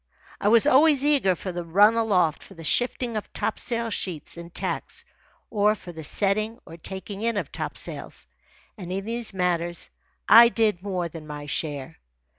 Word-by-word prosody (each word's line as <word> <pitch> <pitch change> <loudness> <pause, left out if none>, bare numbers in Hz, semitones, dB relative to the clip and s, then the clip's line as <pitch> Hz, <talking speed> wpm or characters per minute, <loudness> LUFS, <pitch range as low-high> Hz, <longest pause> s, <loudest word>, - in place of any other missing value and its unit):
I - - -1
was 225 +3 +6
always 290 0 +5
eager 275 -11 +3
for 185 - -6
the 175 0 -5
run 200 +6 +5
aloft 195 -9 +1
for 195 - -14
the 165 - -11
shifting 245 +5 0
of 215 - -5
topsail 230 +1 -2
sheets 175 -7 -3
and 170 0 -10
tacks, - - -4 0.5
or 210 0 +3
for 180 - -11
the 160 -2 -9
setting 215 +7 +1
or 165 - -11
taking 190 +4 -7
in 230 -1 0
of - - -3
topsails; - - -6 0.5
and 180 -2 -7
in 195 +1 -3
these 230 0 -2
matters 175 -2 -1 0.4
I 235 +2 +9
did 220 -6 +1
more 185 -3 -2
than 160 -1 -10
my 145 -1 -7
share. 145 0 -3
195 Hz, 170 wpm, -25 LUFS, 170-225 Hz, 0.5 s, I